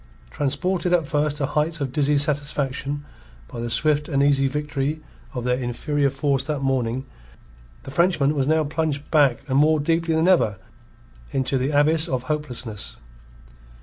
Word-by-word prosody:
Transported 170 +6 -1
at 170 -3 +3
first 150 0 0
to 140 - 0
heights 155 +3 -1
of 140 -3 -2
dizzy 145 0 +2
satisfaction 145 -1 -2 0.4
by 115 - -8
the 120 0 -3
swift 150 +5 +2
and 140 -2 +2
easy 140 -1 +3
victory 150 +1 -2 0.4
of 125 - -3
their 125 +1 0
inferior 140 +4 0
force 135 -1 0
that 150 -2 -2
morning, 130 -1 -1 0.8
the 135 - -8
Frenchman 155 -3 +2
was 140 -3 0
now 160 +1 +3
plunged 150 -1 -2
back 145 -6 +3
and 135 0 +2
more 155 +1 +4
deeply 165 +2 +1
than 160 +2 +2
ever 140 - +3 0.7
into 135 0 -1
the 130 +1 0
abyss 155 +3 +3
of 130 -5 -2
hopelessness. 125 - -3
145 Hz, 155 wpm, -23 LUFS, 135-155 Hz, 0.8 s, more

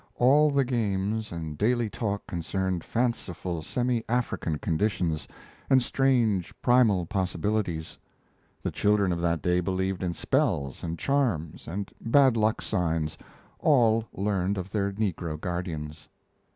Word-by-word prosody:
All 145 +5 +5
the 140 -2 +2
games 110 -3 -1
and 80 -3 -6
daily 120 +1 +2
talk 105 -1 -3
concerned 90 +1 -2
fanciful 95 -8 -2
semi 120 +6 -1
African 115 -10 -1
conditions 85 -2 -1 0.4
and 135 - +6
strange 120 -8 +1
primal 115 -8 +4
possibilities. 95 -2 -2 0.6
The - - -1
children 105 -2 +2
of 85 -1 -1
that 85 -4 0
day 90 +2 +2
believed 95 +1 -1
in 90 -2 -2
spells 85 - 0
and 85 0 -3
charms 115 - -1
and 95 +5 -4
bad 130 +1 +5
luck 110 -1 +1
signs, 80 -6 -1 0.4
all 115 -6 +4
learned 100 0 -1
of 95 +1 -5
their 100 -2 0
negro 90 -6 -2
guardians. 80 -4 -5
100 Hz, 125 wpm, -27 LUFS, 85-115 Hz, 0.6 s, and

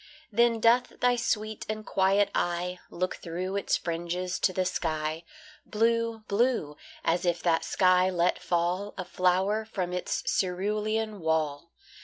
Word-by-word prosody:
Then 235 +1 +3
doth 235 +3 +3
thy 245 0 +3
sweet 220 -2 -2
and 215 0 -4
quiet 195 +1 +2
eye 175 +1 -1
Look 185 +1 -2
through 180 +3 -4
its 200 - +1
fringes 175 +1 -3
to 190 - +2
the 185 0 -1
sky, 160 -2 -2 0.4
Blue 230 0 0
blue 210 - +1 0.3
as 175 +2 +2
if 175 -1 0
that 165 -2 +2
sky 185 0 +3
let 175 -1 +1
fall 180 +4 -1
A 185 - -4
flower 185 +4 +1
from 185 -5 -4
its 180 - -2
cerulean 210 +3 -1
wall. 160 -1 -1
185 Hz, 140 wpm, -28 LUFS, 175-215 Hz, 0.4 s, Then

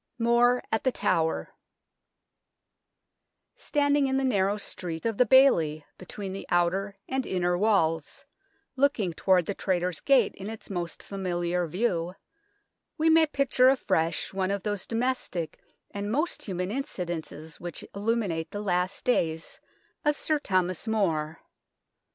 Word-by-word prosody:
MORE 240 +1 +3
AT 225 - 0
THE 260 - +2
TOWER 160 -8 0 2.0
Standing 285 -1 +1
in 265 0 +1
the 270 - 0
narrow 205 -5 +2
street 175 -4 -6
of 225 -3 -1
the 250 - +5
bailey 165 - +5
between 190 +1 -6
the 195 - -7
outer 190 +3 +1
and 265 0 -1
inner 180 -4 0
walls, 180 - +1 0.5
looking 255 - +1
toward 180 +1 +3
the 200 - -2
Traitors' 180 -3 -1
Gate 265 -7 +3
in 195 +2 -7
its 220 -2 -9
most 175 -2 -4
familiar 175 -2 -2
view, 180 -1 -1 0.8
we 320 0 +3
may 320 0 +6
picture 275 -3 +3
afresh 180 -13 0
one 190 -1 0
of 200 -1 -2
those 205 -3 -3
domestic 225 -9 -2 0.3
and 205 +1 -4
most 305 +8 -1
human 185 -1 -3
incidents 175 - -5
which 175 -2 -7
illuminate 200 -6 -1
the 205 - -5
last 185 -2 -1
days 165 -9 0 0.4
of 295 0 +2
Sir 310 -1 0
Thomas 185 - 0
More. 160 -8 0
195 Hz, 135 wpm, -27 LUFS, 175-245 Hz, 2.0 s, may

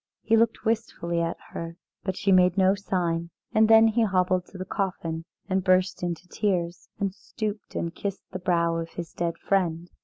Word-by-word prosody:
He 225 - +3
looked 225 0 +2
wistfully 215 -7 0
at 165 0 -1
her, 165 0 -6 0.3
but 190 -2 -2
she 195 - +1
made 185 0 +5
no 190 0 +5
sign, 175 -4 -1 0.2
and 220 0 +5
then 225 0 +8
he 225 +2 +1
hobbled 185 -3 +2
to 195 - -11
the 185 - -5
coffin 170 -5 -3 0.2
and 190 -1 0
burst 185 0 +3
into 175 0 -3
tears, 180 -4 -1
and 195 -2 0
stooped 210 +1 -5
and 170 0 -2
kissed 200 +1 -4
the 185 - -4
brow 170 -2 +1
of 165 0 -4
his 170 -2 -6
dead 170 -1 -2
friend. 175 -3 0
185 Hz, 185 wpm, -26 LUFS, 170-200 Hz, 0.3 s, then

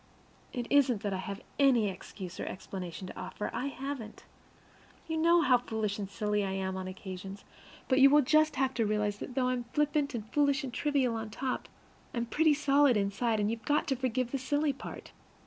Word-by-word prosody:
It 245 -1 -3
isn't 260 -7 +4
that 205 -2 -1
I 185 - -2
have 200 +1 -5 0.2
any 255 -6 +5
excuse 185 -1 -7
or - - -3
explanation 185 -1 -6
to 185 - -8
offer; 185 +3 -5
I 275 - -2
haven't. 270 -5 -6 0.8
You 320 - -2
know 335 +1 +5
how 255 -3 +5
foolish 220 -4 -3
and 200 -2 -4
silly 210 0 0
I 190 -1 -2
am 190 -1 -2
on 185 0 -4
occasions, 190 +1 -7 0.4
but 260 -1 +3
you 275 +1 +9
will 295 +1 +6
just 310 +3 +3
have 265 0 +1
to 230 -3 +1
realize 210 -1 0
that 250 - -7
though 255 -2 +2
I'm 250 -1 -1
flippant 295 -2 +1
and 220 -2 -5
foolish 285 -1 +3
and 255 -3 -5
trivial 275 -3 +1
on 220 -1 -4
top, 255 +4 -3 0.5
I - - -3
am 235 - 0
pretty 305 +5 +3
solid 280 -3 +4
inside; 210 +3 0
and 210 +1 +1
you've 230 0 -4
got 295 0 +2
to 270 - +2
forgive 255 -1 -1
the 275 - -1
silly 290 +2 +1
part. 270 - -9
245 Hz, 205 wpm, -31 LUFS, 205-280 Hz, 0.8 s, you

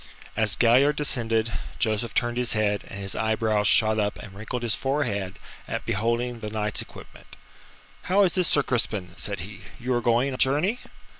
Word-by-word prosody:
As 110 -2 +4
Galliard 130 +5 +4
descended, 115 -6 0 0.2
Joseph 110 0 -1
turned 120 0 0
his 125 -1 0
head, 105 -2 0
and 100 - -7
his 95 -1 -3
eyebrows 110 -2 +1
shot 110 0 +4
up 105 -1 -1
and 100 - -10
wrinkled 110 +5 -5
his 115 -2 +1
forehead 115 -9 -1 0.3
at - - -4
beholding 115 +3 -1
the 110 - -5
knight's 105 -1 -1
equipment. - - -13 0.8
"How 200 +2 +5
is 185 - +3
this, 180 -3 +2
Sir 145 - +3
Crispin?" 105 -8 -1
said 100 -4 -3
he. 100 +3 -9 0.2
"You 125 +1 -1
are 120 - +1
going 120 +4 +2
a - - -4
journey?" 150 - +2
115 Hz, 175 wpm, -25 LUFS, 105-125 Hz, 0.8 s, How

